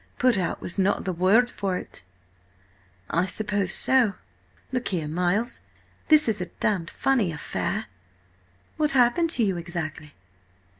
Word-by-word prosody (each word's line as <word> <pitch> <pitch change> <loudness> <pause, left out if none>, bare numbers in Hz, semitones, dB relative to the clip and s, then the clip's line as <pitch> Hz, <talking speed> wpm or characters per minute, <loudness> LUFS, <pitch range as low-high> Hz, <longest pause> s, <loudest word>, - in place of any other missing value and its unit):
Put 250 -2 +3
out 180 -4 -2
was 175 - -4
not 195 +1 +1
the 185 - -1
word 200 +8 +3
for 190 -2 -2
it." - - -9 1.1
"I 170 +2 +2
suppose 205 -2 -1
so. 250 -4 +3 0.6
Look 250 -1 -2
here, 170 -6 -2
Miles, 180 +9 0 0.5
this 305 -3 +5
is 210 -4 0
a 180 - -3
damned 175 -1 -1
funny 245 -10 +1
affair!" 150 - -3 0.9
"What 305 -2 +1
happened 255 +8 +4
to 235 - +3
you 195 -4 +1
exactly?" 160 -3 -6
195 Hz, 140 wpm, -25 LUFS, 175-245 Hz, 1.1 s, this